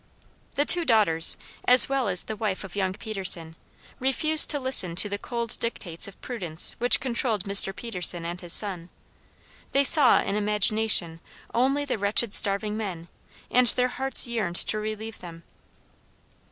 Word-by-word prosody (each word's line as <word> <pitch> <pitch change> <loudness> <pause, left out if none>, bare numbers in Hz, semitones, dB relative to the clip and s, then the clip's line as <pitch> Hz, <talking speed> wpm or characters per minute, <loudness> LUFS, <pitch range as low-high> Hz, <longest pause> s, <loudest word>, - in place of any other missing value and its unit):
The 290 - 0
two 350 +2 +7
daughters, 205 - +3 0.3
as 250 +1 +6
well 270 -3 -2
as 180 -2 +1
the 220 - -7
wife 205 -3 -4
of 195 -1 -11
young 190 -2 -2
Peterson, 185 -6 +1 0.4
refused 305 +4 +4
to 290 - 0
listen 255 -10 -1
to 200 - 0
the 200 0 -6
cold 235 -1 -5
dictates 180 -8 -4
of 200 - -14
prudence 175 -10 -4
which 245 +1 +3
controlled 235 -5 -3
Mr. 200 -1 +4
Peterson 180 -5 0
and 175 +1 -7
his 175 -2 -6
son: 185 -3 -1 0.8
they 275 - +2
saw 280 0 +4
in 195 - -4
imagination 210 -4 0 0.3
only 270 +4 0
the 255 -6 -4
wretched 205 +2 0
starving 210 +1 0
men, 180 -6 -7 0.4
and 250 0 +2
their 250 +1 -1
hearts 265 +2 -1
yearned 225 -7 -4
to 215 - -2
relieve 215 +1 -7
them. 170 -1 -12
210 Hz, 155 wpm, -24 LUFS, 185-245 Hz, 0.8 s, two